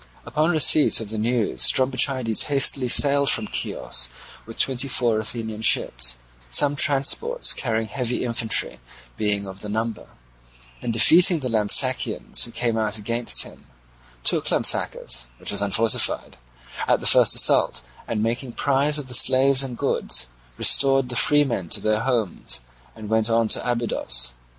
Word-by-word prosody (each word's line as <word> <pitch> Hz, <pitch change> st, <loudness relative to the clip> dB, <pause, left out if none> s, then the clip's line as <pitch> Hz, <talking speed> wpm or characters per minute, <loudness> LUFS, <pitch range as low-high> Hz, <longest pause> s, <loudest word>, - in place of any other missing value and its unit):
Upon 155 Hz, +2 st, -1 dB
receipt 155 Hz, -2 st, +4 dB
of 110 Hz, -2 st, -7 dB
this 110 Hz, -, -5 dB
news 115 Hz, 0 st, -2 dB
Strombichides 130 Hz, -3 st, +1 dB
hastily 135 Hz, -2 st, +1 dB
sailed 140 Hz, +2 st, +3 dB
from 110 Hz, -, 0 dB
Chios -, -, -4 dB, 0.4 s
with 115 Hz, -, -10 dB
twenty 130 Hz, 0 st, 0 dB
four 120 Hz, -4 st, +1 dB
Athenian 110 Hz, 0 st, -5 dB
ships, -, -, 0 dB, 0.3 s
some 145 Hz, -, +1 dB
transports 145 Hz, -, +1 dB
carrying 115 Hz, -3 st, -3 dB
heavy 125 Hz, -1 st, -4 dB
infantry 115 Hz, -2 st, -1 dB, 0.4 s
being 100 Hz, -, -3 dB
of 95 Hz, 0 st, -11 dB
the 105 Hz, -, -8 dB
number, 110 Hz, +1 st, -5 dB, 0.7 s
and -, -, -4 dB
defeating 160 Hz, -, +5 dB
the 130 Hz, -, -4 dB
Lampsacenes 105 Hz, -3 st, +1 dB
who -, -, -11 dB
came 115 Hz, -1 st, -2 dB
out 110 Hz, 0 st, -1 dB
against 115 Hz, +3 st, +1 dB
him, -, -, -15 dB, 0.6 s
took -, -, 0 dB
Lampsacus, -, -, 0 dB
which -, -, -4 dB
was 100 Hz, 0 st, +1 dB
unfortified, 110 Hz, +3 st, 0 dB, 0.5 s
at -, -, +2 dB
the -, -, -9 dB
first -, -, +5 dB
assault, 65 Hz, -1 st, +2 dB, 0.2 s
and 110 Hz, -2 st, -3 dB
making 120 Hz, +2 st, -4 dB
prize 140 Hz, +3 st, 0 dB
of 145 Hz, -, -5 dB
the 125 Hz, -, -4 dB
slaves 130 Hz, +2 st, +4 dB
and 130 Hz, -3 st, -4 dB
goods 65 Hz, -, -2 dB, 0.3 s
restored 135 Hz, -2 st, +2 dB
the 120 Hz, -, -6 dB
freemen 125 Hz, -, +1 dB
to -, -, +1 dB
their 110 Hz, 0 st, -1 dB
homes, 115 Hz, -, -2 dB, 0.3 s
and 110 Hz, -2 st, -10 dB
went 110 Hz, +1 st, -1 dB
on 115 Hz, 0 st, +1 dB
to -, -, 0 dB
Abydos. 65 Hz, -, -1 dB
115 Hz, 150 wpm, -22 LUFS, 110-135 Hz, 0.7 s, defeating